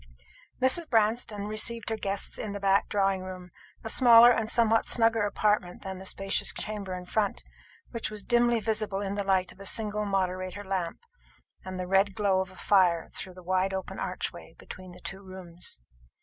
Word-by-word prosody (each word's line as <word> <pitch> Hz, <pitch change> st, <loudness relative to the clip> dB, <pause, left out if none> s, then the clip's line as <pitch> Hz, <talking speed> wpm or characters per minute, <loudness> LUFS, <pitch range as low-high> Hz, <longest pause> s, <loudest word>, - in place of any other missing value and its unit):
Mrs. 260 Hz, +6 st, +4 dB
Branston 220 Hz, -2 st, +1 dB
received 220 Hz, +2 st, 0 dB
her 225 Hz, -, -1 dB
guests 200 Hz, -2 st, -2 dB
in 210 Hz, -2 st, -4 dB
the 200 Hz, -, -5 dB
back 195 Hz, 0 st, +2 dB
drawing 195 Hz, -2 st, +1 dB
room, 185 Hz, -1 st, -9 dB, 0.3 s
a -, -, -5 dB
smaller 235 Hz, 0 st, +8 dB
and 225 Hz, -2 st, 0 dB
somewhat 225 Hz, -1 st, +3 dB
snugger 225 Hz, -2 st, +3 dB
apartment 205 Hz, -3 st, 0 dB
than 190 Hz, -1 st, -6 dB
the 190 Hz, -, -6 dB
spacious 195 Hz, +1 st, 0 dB
chamber 200 Hz, -3 st, -5 dB
in 180 Hz, 0 st, -8 dB
front, 205 Hz, +2 st, -1 dB, 0.5 s
which 230 Hz, -2 st, -3 dB
was 210 Hz, -1 st, -7 dB
dimly 240 Hz, -1 st, +2 dB
visible 215 Hz, -3 st, -1 dB
in 200 Hz, -1 st, -3 dB
the 200 Hz, 0 st, -2 dB
light 190 Hz, -2 st, +1 dB
of -, -, -18 dB
a 195 Hz, -, -10 dB
single 210 Hz, -1 st, 0 dB
moderator 185 Hz, 0 st, -2 dB
lamp 190 Hz, -3 st, -3 dB, 0.6 s
and 185 Hz, 0 st, -6 dB
the 180 Hz, -, -3 dB
red 195 Hz, +1 st, +2 dB
glow 200 Hz, -3 st, +2 dB
of 190 Hz, -, -5 dB
a 185 Hz, -, -15 dB
fire 180 Hz, -4 st, +2 dB
through 185 Hz, -1 st, -6 dB
the 185 Hz, -, -13 dB
wide 185 Hz, +2 st, 0 dB
open 190 Hz, -, -6 dB
archway -, -, -5 dB
between 185 Hz, -1 st, -11 dB
the -, -, -14 dB
two 195 Hz, 0 st, -7 dB
rooms. 180 Hz, -, -6 dB
195 Hz, 185 wpm, -28 LUFS, 185-215 Hz, 0.6 s, smaller